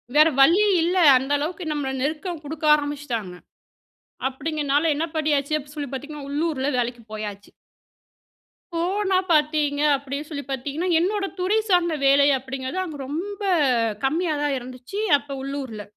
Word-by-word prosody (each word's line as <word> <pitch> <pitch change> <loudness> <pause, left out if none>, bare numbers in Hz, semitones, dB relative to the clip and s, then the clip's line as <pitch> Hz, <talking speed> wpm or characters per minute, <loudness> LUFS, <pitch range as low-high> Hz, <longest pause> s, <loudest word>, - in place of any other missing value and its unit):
வேற 305 +1 +7
வழியே 360 +10 +6
இல்ல, 350 +3 0 0.2
அந்த 265 +2 -3
அளவுக்கு 345 +6 -4
நம்மள 290 -3 -2
நெருக்கம் 315 +4 -2
குடுக்க 310 +1 -5
ஆரம்பிச்சுட்டாங்க. 290 -9 -4 1.0
அப்டிங்கனால 295 +2 0
என்ன 315 - 0
பண்ணியாச்சு 300 -1 +1
அப்டி 290 +1 -12
சொல்லி 290 -2 -4
பாத்தீங்கன்னா, 290 +1 -6
உள்ளூர்ல 290 -2 -1
வேலைக்கு 240 0 -2
போயாச்சு. 205 -2 -6 1.2
போனா 380 +3 0 0.2
பாத்தீங்க 300 -2 +2 0.2
அப்படின்னு 280 +2 -6
சொல்லி 285 -3 -5
பாத்தீங்கன்னா 280 +7 -3
என்னோட 395 +3 0
துறை 390 +5 +2
சார்ந்த 345 -3 +3
வேலை 280 +1 +5
அப்டிங்கிறது 265 +4 -5
அங்க 315 -5 -7
ரொம்ப 385 +8 -5 0.6
கம்மியா 315 +5 +1
தான் 290 -1 +1
இருந்துச்சு 255 +9 -7 0.2
அப்போ 280 0 -9
உள்ளூர்ல. 265 -6 -5
290 Hz, 130 wpm, -23 LUFS, 270-330 Hz, 1.2 s, வேற